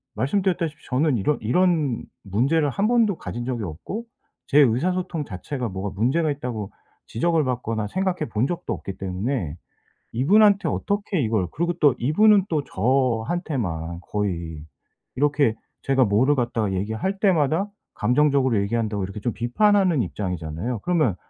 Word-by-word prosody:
말씀드렸다시피 170 0 -1
저는 140 +2 +2
이런 140 +9 +1
이런 150 +1 +1 0.2
문제를 135 - +1
1 200 +10 0
번도 225 -6 +3
가진 120 0 -5
적이 120 -3 -3
없고 100 - -6 0.4
제 145 - +4
의사소통 165 +6 +1
자체가 120 +6 -5
뭐가 95 +1 -4
문제가 150 +7 +2
있다고 120 -7 -5 0.4
지적을 160 +7 +1
받거나 115 -4 -2
생각해 185 - -1
본 110 +2 0
적도 175 - -3
없기 95 -1 -7
때문에 95 - -3 0.6
이분한테 200 - +4
어떻게 200 -3 -1
이걸 110 -7 +1
그리고 170 +2 -1
또 145 -5 +5
이분은 200 - +4
또 150 -4 0
저한테만 115 - -1
거의 85 -7 -3 0.5
이렇게 145 -4 +2 0.3
제가 135 -1 +3
뭐를 120 +7 +3
갖다가 115 -5 0
얘기할 110 - -2
때마다 170 -1 +2 0.3
감정적으로 130 0 +2
얘기한다고 105 -1 -1
이렇게 95 +2 -6
좀 120 +3 -1
비판하는 180 - +2
입장이잖아요. 90 +3 -4
그러면 155 - +1
130 Hz, 345 characters per minute, -23 LUFS, 105-165 Hz, 0.6 s, 또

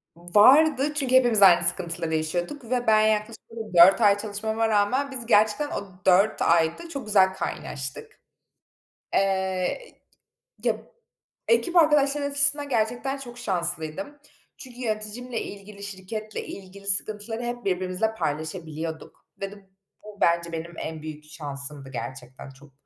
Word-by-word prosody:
Vardı 270 - +4
çünkü 265 -3 0
hepimiz 240 -5 +5
aynı 175 -3 +7
sıkıntıları 170 -2 +1
yaşıyorduk 175 - -3
ve 245 -1 -1
ben 215 -1 +5
yaklaşık 215 +1 0
orada 225 -3 -8
4 190 +6 +8
ay 205 -2 +5
çalışmama 220 +2 -2
rağmen 220 +7 +1
biz 255 -3 -5
gerçekten 220 +5 +2
o - - -3 0.2
4 195 +4 +3
ayda 165 - +1
çok 280 -6 -6
güzel 190 -3 +4
kaynaştık. 135 -7 -6 0.9
Eee, 190 - -1 0.7
ı - - 0
ya - - +2 0.7
ekip 370 -7 +1
arkadaşlarım 290 -3 +3
açısından 285 0 +2
gerçekten 245 +3 -1
çok 245 -3 -10
şanslıydım. 175 - -2 0.4
Çünkü 250 -2 -12
yöneticimle 230 +1 -4
ilgili, 200 0 -10
şirketle 205 +2 -6
ilgili 195 +1 -11
sıkıntıları 215 +4 +1
hep 240 0 -5
birbirimizle 185 +3 -1
paylaşabiliyorduk 160 -1 -5 0.2
ve 195 0 -4
de 200 -1 -16 0.3
bu 210 -1 -12
bence 170 0 +2
benim 165 +1 -6
en 160 -1 -6
büyük 155 -1 -8
şansımdı. 140 -2 -6
Gerçekten 125 +1 -8
çok, 135 +2 -17
205 Hz, 130 wpm, -25 LUFS, 170-245 Hz, 0.9 s, 4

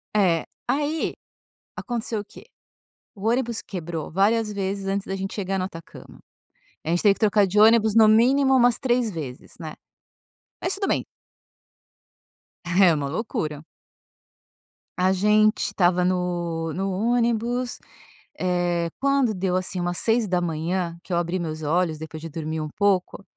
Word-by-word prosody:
É. 180 -6 +3 0.2
Aí, 295 +3 0 0.6
aconteceu 230 -3 -3
o 205 - -8
quê? - - -15 0.7
O 205 +1 -3
ônibus 235 -1 0
quebrou 170 -4 -5
várias 210 +4 +2
vezes 195 0 -3
antes 195 0 -2
da 195 - -3
gente 195 0 -5
chegar 195 -1 -2
no 185 - -1
Atacama. 165 -3 -11 0.7
A - - -5
gente 175 +1 +1
teve 205 -2 +5
que - - -18
trocar 210 -2 +3
de 200 +3 +1
ônibus, 220 0 +5
no 220 -1 +7
mínimo 265 +5 +4
umas 245 -1 +4
3 245 -3 +1
vezes, 145 -8 -7
né, 155 -2 -6 0.9
mas 365 - 0
tudo 395 0 -2
bem. - - 0 1.6
É 175 0 +5
uma 145 -2 -2
loucura. 155 -5 -3 1.3
A 185 +1 +3
gente 210 +2 +3
estava 180 -3 +2
no 175 -3 -1
no 195 +3 -2
ônibus, 235 +3 0 0.6
eh, 175 -2 0
quando 275 -4 +2
deu 185 -1 -1
assim 185 0 -2
umas 175 0 -1
06h, 175 -5 0
que 185 - -6
eu - - +2
abri 175 +2 -1
meus 155 -2 -4
olhos 160 +1 0
depois 160 0 -8
de 165 - -7
dormir 160 0 -4
um 155 - -4
pouco, 200 -1 +1
190 Hz, 145 wpm, -24 LUFS, 170-220 Hz, 1.6 s, no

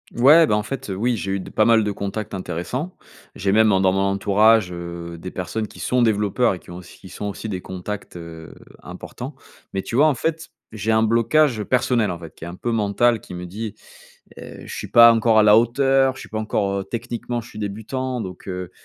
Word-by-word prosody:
Ouais, 150 +7 +7
bah 105 - +2
en 105 - 0
fait, 125 +1 -6
heu, 95 - -3
oui, 115 +4 0
j'ai 95 0 -4
eu 100 - -1
de - - -9
pas 110 - +2
mal 115 -1 +5
de 105 - -1
contacts 100 +1 -5
intéressants. 95 - -4 0.4
J'ai 95 0 -1
même 110 0 +4
en 95 - +3
dans 95 - +4
mon 95 - 0
entourage, 100 +1 +3
heu, 85 -1 -7
des 90 +3 -8
personnes 105 +4 -4
qui - - -15
sont 125 0 +1
développeurs 110 +1 +2
et 90 - -7
qui - - -15
ont 85 - -8
aussi 90 -1 -13
qui 95 - -13
sont 105 - -7
aussi 105 +2 -5
des 95 - -3
contacts, 95 +3 -7
heu, 85 -1 -10 0.3
importants. 130 +3 -8 0.4
Mais 95 - -1
tu 115 - -4
vois, 150 +3 +6
en 150 - +2
fait, 160 +5 -3 0.2
j'ai 110 0 -1
un 110 - +3
blocage 115 +2 +2
personnel, 125 -4 +1
en 85 - -6
fait, 80 -2 -11
qui - - -10
est, - - -7
un 85 - -7
peu, 120 - -3
mental, 115 +2 +2
qui 90 - -12
me 90 0 -6
dit: 105 +4 -6 0.6
«Heu, - - -10
je - - -8
suis - - -6
pas 115 0 +8
encore 115 -1 +3
à 110 - +6
la 105 0 +7
hauteur. 135 +3 +2
Je - - -10
suis - - -11
pas 110 - -3
encore, 100 -2 -1
heu, - - -6
techniquement 120 +3 -4
je 115 - -14
suis 105 - -10
débutant 115 +5 -4
donc, 90 -2 -9
heu, 90 -1 -5
105 Hz, 240 wpm, -22 LUFS, 95-120 Hz, 0.6 s, pas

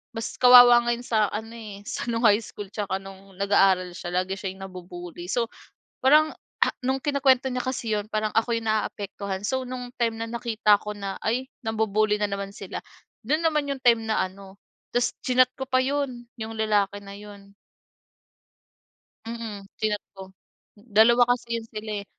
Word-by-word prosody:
Mas 225 0 -4
kawawa 245 -1 +9
nga 240 - +3
yun 245 - -9
sa 215 -3 +2
ano, 220 +2 -5
eh, 210 -3 -9
sa - - -4
no'ng 230 +1 -1
high 210 0 +6
school 205 -1 -8
tsaka 200 -3 -2
no'ng 195 0 -13
nag-aaral 195 -2 +3
siya. 175 0 -7 0.2
Lagi 190 +1 -5
siya 190 - -3
yung 195 - -10
nabubully. 175 -1 -9
So, 235 +3 +1 0.6
parang 305 +3 +6 0.3
ha - - +5
no'ng 265 +1 0
kinukuwento 270 -3 +3
niya 250 0 -2
kasi 235 -4 -1
yun, 205 - -4
parang 215 0 0
ako 230 +1 +2
yung 230 -1 -2
naaapektuhan. 200 -2 -3
So 260 0 -1
no'ng 250 -1 -6
time 230 -2 +1
na 230 - -4
nakita 225 -3 +2
ko 210 - -6
na, 200 -1 -5
ay 250 +4 0 0.2
nambubully 215 -1 +1
na 210 - +1
naman 200 0 -4
sila, - - -6 0.5
do'n 305 +2 +2
naman 305 -2 +2
yung 265 - -11
time 230 -2 +4
na 220 - +1
ano 190 0 -14 0.3
ta's 245 0 0
chinat 255 0 +3
ko 265 0 -7
pa 255 0 +2
yun, 270 -3 -2 0.2
yung 220 0 -5
lalaki 210 -2 +1
na 200 - -9
yun. 200 -1 -12 1.7
Mm, 225 -3 -6 0.2
chinat 210 -1 -1
ko. 190 0 -11 0.4
Dalawa 225 +3 +4
kasi 235 -1 -1
yun 230 - -4
sila, 215 0 -6
eh. - - -26
220 Hz, 180 wpm, -25 LUFS, 200-245 Hz, 1.7 s, kawawa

